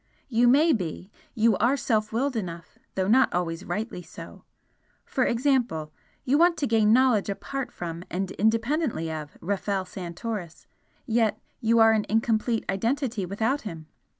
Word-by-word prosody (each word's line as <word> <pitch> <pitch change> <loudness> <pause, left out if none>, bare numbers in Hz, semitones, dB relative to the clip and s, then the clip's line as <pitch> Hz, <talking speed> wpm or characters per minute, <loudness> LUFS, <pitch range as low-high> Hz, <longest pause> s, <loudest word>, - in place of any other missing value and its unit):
You 240 0 +3
may 300 +6 +5
be, 185 -1 -4 0.2
you 225 -2 +4
are 250 +5 +2
self 215 -5 0
willed 255 +4 0
enough, 170 -6 -6 0.2
though 190 -1 0
not 255 +5 +4
always 175 0 -2
rightly 210 -2 -4
so 170 - -11 0.6
for 260 - 0
example, 235 - 0 0.3
you 280 +4 +3
want 345 0 +4
to 290 - 0
gain 220 -4 +3
knowledge 240 -4 +4
apart 270 +6 -4
from 170 0 -6
and 190 +1 -3
independently 225 - 0
of 155 -2 -7
Rafel 195 +1 -1
Santoris, 180 0 -6 0.4
yet 225 -2 +1 0.2
you 230 +1 +2
are 225 0 +7
an 215 -1 +1
incomplete 225 +1 +1
identity 225 0 -1
without 225 +9 0
him! 165 -7 -7
220 Hz, 150 wpm, -26 LUFS, 185-245 Hz, 0.6 s, are